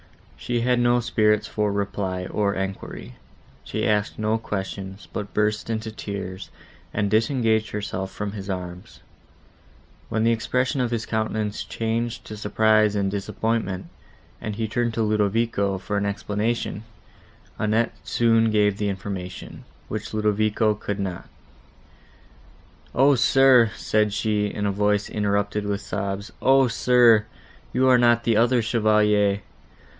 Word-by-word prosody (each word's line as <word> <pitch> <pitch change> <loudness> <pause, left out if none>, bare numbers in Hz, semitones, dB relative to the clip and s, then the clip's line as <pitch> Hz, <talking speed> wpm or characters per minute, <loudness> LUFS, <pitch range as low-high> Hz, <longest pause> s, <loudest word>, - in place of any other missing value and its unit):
She 120 -1 -2
had 125 0 +2
no 120 0 +3
spirits 105 -3 +2
for 105 -1 -1
reply, 100 -2 -2
or 100 +1 0
enquiry; 95 -10 -5 0.5
she - - -2
asked 105 -1 0
no 110 +1 0
questions, 95 -2 -5
but 105 -1 -5
burst 105 +1 0
into 110 0 -3
tears, 100 -3 -6 0.4
and 100 -1 -1
disengaged 110 -1 +2
herself 100 -2 -4
from 105 -1 -4
his 100 -1 -7
arms; 90 -1 -6 1.1
when 110 0 0
the 115 - +4
expression 125 +4 0
of 125 - 0
his 115 -1 -2
countenance 110 -1 -2
changed 115 +1 -3
to 110 - -7
surprise 110 0 +2
and 100 -1 0
disappointment, 100 -1 -2 0.6
and 105 - -4
he 110 0 -2
turned 120 +1 -1
to 115 - +1
Ludovico, 105 -1 +1
for 95 +2 -4
an 100 0 0
explanation; 105 +2 -2 0.8
Annette 110 +2 +1
soon 115 -1 +3
gave 105 -2 +2
the 105 -1 0
information, 95 -2 -6 0.2
which 110 0 -5
Ludovico 105 +1 +2
could 105 -1 -5
not. 95 -3 -4 1.7
"O, 135 +3 +5
sir!" 130 -2 +5
said 105 0 +1
she, 105 0 0
in 105 0 -3
a 100 - +1
voice, 105 +1 +1
interrupted 105 0 -1
with 100 0 -2
sobs; 100 0 -4
"O, 135 0 +5
sir! 115 -2 +4 0.4
you 130 +1 +2
are 125 -1 +6
not 120 -1 +4
the 115 - +2
other 120 +2 +3
Chevalier. 105 -2 +2
105 Hz, 135 wpm, -24 LUFS, 100-115 Hz, 1.7 s, are